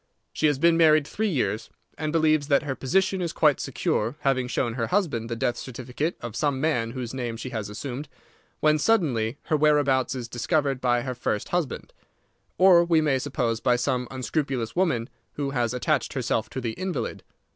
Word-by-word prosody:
She 155 - +2
has 145 -2 +2
been 170 +3 +4
married 155 -3 +5
three 215 +8 -1
years, 110 - -1 0.3
and 155 -1 -3
believes 155 -2 +2
that 140 0 +3
her 140 -2 -2
position 190 +8 0
is 170 -2 -1
quite 150 -5 +3
secure, 115 +6 -1
having 130 -2 +1
shown 120 -2 -1
her 115 -1 -2
husband 160 - 0
the 115 - -2
death 120 +1 -1
certificate 130 +6 -4
of 120 -2 -6
some 140 0 0
man 135 -6 0
whose 125 -2 -5
name 120 -3 -3
she 125 +3 -6
has 110 -4 -4
assumed, 135 +6 -6 0.5
when 155 0 +4
suddenly 140 - +1
her 155 - 0
whereabouts 145 -3 +2
is 125 -2 -5
discovered 135 +2 0
by 120 -1 +2
her 130 -1 -3
first 110 -3 -2
husband; 175 -7 -2 0.6
or, 180 -2 +7
we 170 -2 +3
may 145 -4 +2
suppose, 125 -4 -1
by 125 0 +2
some 125 0 -1
unscrupulous 130 -3 -2
woman 160 -11 +1 0.3
who 140 -1 -3
has 120 -4 0
attached 135 +3 0
herself 115 -4 -1
to 130 - -5
the 120 -3 -2
invalid. 185 +7 -4
135 Hz, 185 wpm, -25 LUFS, 120-155 Hz, 0.6 s, or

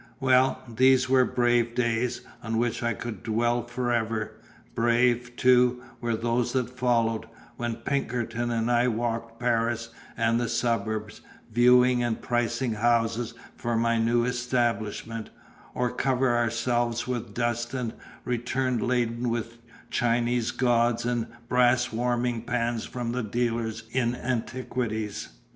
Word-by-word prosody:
Well, 130 0 +3
these 130 +3 +4
were 130 -1 +4
brave 120 -1 +1
days, 120 0 0 0.2
on 115 -1 -2
which 120 0 0
I 120 -2 0
could 110 -4 -6
dwell 120 +2 +1
forever. 120 -2 -1 0.4
Brave, 120 +1 +2
too, 125 0 +4 0.2
were 120 -1 -1
those 120 +1 0
that 125 -2 0
followed, 115 -3 +1 0.3
when 120 -1 -2
Pinkerton 120 -4 -2
and 115 0 0
I 120 +1 +3
walked 115 -1 -2
Paris 115 -1 0 0.3
and 115 0 +2
the 120 -2 -1
suburbs, 110 -2 -1 0.3
viewing 125 +1 +5
and 120 -2 -1
pricing 120 0 0
houses 115 +1 +1 0.2
for 120 -1 -1
my 115 0 +2
new 120 +1 +2
establishment, 115 -3 -1 0.5
or 125 -1 0
covered 130 -2 +1
ourselves 120 0 0
with 120 -4 -4
dust 120 +1 -1
and 120 -3 -2 0.3
returned 125 0 -1
laden 120 -1 0
with 115 0 -3 0.3
Chinese 120 0 +1
gods 120 -1 +2
and 120 -2 0 0.2
brass 120 -1 +3
warming 120 0 0
pans 120 -1 -1
from 120 -2 -4
the 125 +1 -1
dealers 115 0 -2
in 125 -1 +1
antiquities. 120 -3 -3
120 Hz, 125 wpm, -27 LUFS, 115-125 Hz, 0.5 s, viewing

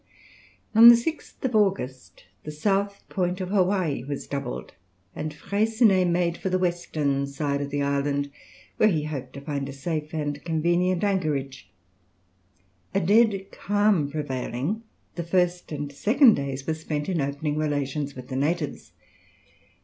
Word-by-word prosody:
On 225 +2 +9
the 235 - +11
6th 260 -1 -3
August 130 - -1 0.2
the - - -7
south 200 +6 -1
point 180 0 -1
of 185 -1 -4
Hawaï 185 - +1
was 145 -1 -4
doubled, 140 -3 -5 0.4
and 155 +1 -4
Freycinet 200 +2 +2
made 170 0 0
for 190 - -2
the 185 - +2
western 155 -6 -1
side 140 0 -2
of 140 - -3
the 145 0 -1
island, 140 0 0 0.5
where 215 - +5
he 155 -6 0
hoped 135 -4 -5
to 140 - -8
find 140 -1 -3
a - - -6
safe 150 +2 -4
and 145 -2 -3
convenient 175 +3 +1
anchorage. 150 -10 -1 1.3
A - - +4
dead 200 +1 +3
calm 205 -7 +1
prevailing, 145 - -3 0.3
the 170 - -4
first 180 0 0
and 145 -1 -4
second 225 - +5
days 135 -3 -3
were 160 - 0
spent 155 -2 -4
in 180 -5 0
opening 145 +2 -2
relations 145 -1 -2
with 125 -1 -9
the 130 - -4
natives. 150 +3 -2
155 Hz, 145 wpm, -25 LUFS, 140-190 Hz, 1.3 s, the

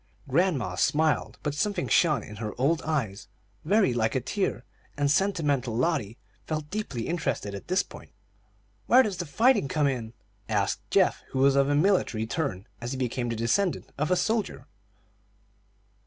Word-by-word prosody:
Grandma 140 - +1
smiled, 155 - +1
but 150 - -1
something 205 +7 -1
shone 160 -4 +3
in 105 - -10
her 105 +1 -6
old 155 +5 +2
eyes 130 -11 -2 0.4
very 195 - +3
like 110 0 0
a - - +3
tear, 160 - -2 0.3
and 145 -1 +2
sentimental 150 - +1
Lotty 125 -7 0 0.3
felt 155 -1 -4
deeply 185 - -3
interested 165 -11 -2
at 100 - -8
this 185 +2 +2
point. - - -13 0.8
"Where 255 +2 +7
does 200 -6 -3
the 175 - -4
fighting 230 - +3
come 150 +2 +1
in?" 120 -5 -2 0.4
asked 100 -3 0
Geoff, - - +3
who - - -2
was 135 0 +5
of 140 0 +3
a 145 - +2
military 150 - +2
turn, 115 - -3 0.2
as 120 +3 -3
became 125 -1 -2
the 115 - -2
descendant 115 - 0
of 150 - 0
a 180 - +4
soldier. 195 - -1
145 Hz, 160 wpm, -27 LUFS, 120-175 Hz, 0.8 s, Where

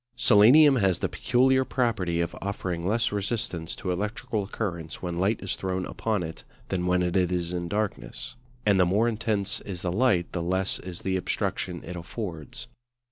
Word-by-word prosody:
Selenium 130 +7 +7
has 95 -6 +2
the - - -1
peculiar 130 +1 +3
property 105 -11 0
of 85 - -2
offering 90 -3 -3
less 115 +3 +1
resistance 100 -5 -2
to 90 - -3
electrical 105 +2 -2
currents 85 -8 -4
when 90 -1 -2
light 95 +6 +1
is 95 - -2
thrown 95 -1 -2
upon 110 -5 -1
it 80 0 -7 0.3
than 90 -2 -1
when 90 0 +3
it 90 +1 -1
is 90 -2 +1
in 85 -1 -2
darkness: 105 +2 -3 0.3
and 100 -2 +4
the 90 - +6
more 105 +6 +3
intense 110 -3 0
is 90 -4 -6
the 90 - 0
light 100 -4 +2
the 85 - -2
less 95 +3 0
is 90 -2 -8
the 95 0 0
obstruction 90 -1 -2
it 90 - -7
affords. 105 +6 -6
95 Hz, 175 wpm, -27 LUFS, 90-110 Hz, 0.3 s, Selenium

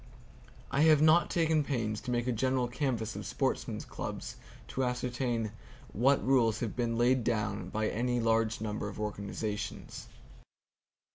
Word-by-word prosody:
I 140 - +2
have 155 -1 +6
not 155 +3 +5
taken 160 -3 +2
pains 115 -7 -2
to - - -7
make 120 -1 0
a 125 - +1
general 130 +2 +1
canvass 120 -4 -2
of - - -5
sportsmen's - - -2
clubs - - -6 0.3
to 130 - -1
ascertain 125 -2 -1 0.4
what 135 +6 +3
rules 120 -4 +3
have 115 -4 -2
been 115 -2 -1
laid 125 +1 +3
down 105 -5 -1
by 110 +2 -1
any 120 +3 0
large 115 -1 +1
number 105 -1 -3
of 100 - -9
organizations. 105 0 -4
120 Hz, 145 wpm, -31 LUFS, 110-130 Hz, 0.4 s, have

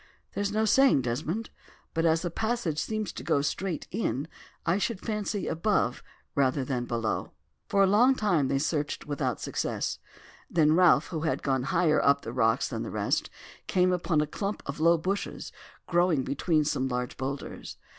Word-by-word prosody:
"There - - -2
is 205 0 0
no 215 +1 +1
saying, 260 - +5
Desmond. 155 - -3 0.4
But 165 0 +2
as 160 +1 +2
the 175 - -2
passage 220 -7 -1
seems 215 -2 -2
to - - -7
go 140 - +2
straight 180 +2 -2
in, 150 - -1 0.4
I 175 +4 +2
should 215 -1 -1
fancy 210 -2 -2
above 165 - 0 0.3
rather 135 -1 +1
than 125 -2 -2
below." 115 -2 -2 0.4
For 200 -1 +4
a - - +6
long 235 +7 +5
time 180 - +1
they 135 - +1
searched 145 0 -2
without 140 -5 -2
success; - - -2 0.5
then 155 -2 +4
Ralph, 180 +1 +5
who 165 - -3
had 160 +1 -1
gone 135 -2 0
higher 160 -4 +3
up 140 0 +3
the 115 - -6
rocks 115 -3 +2
than - - -4
the - - -4
rest, - - -1 0.4
came 185 0 +3
upon 170 -3 +1
a - - +1
clump 200 +7 -4
of 140 +2 -5
low 170 +2 +5
bushes 190 +5 -3 0.3
growing 175 -5 +2
between 155 +3 +1
some 130 -3 0
large 125 0 -3
boulders. 135 +1 -5
160 Hz, 175 wpm, -28 LUFS, 140-195 Hz, 0.5 s, a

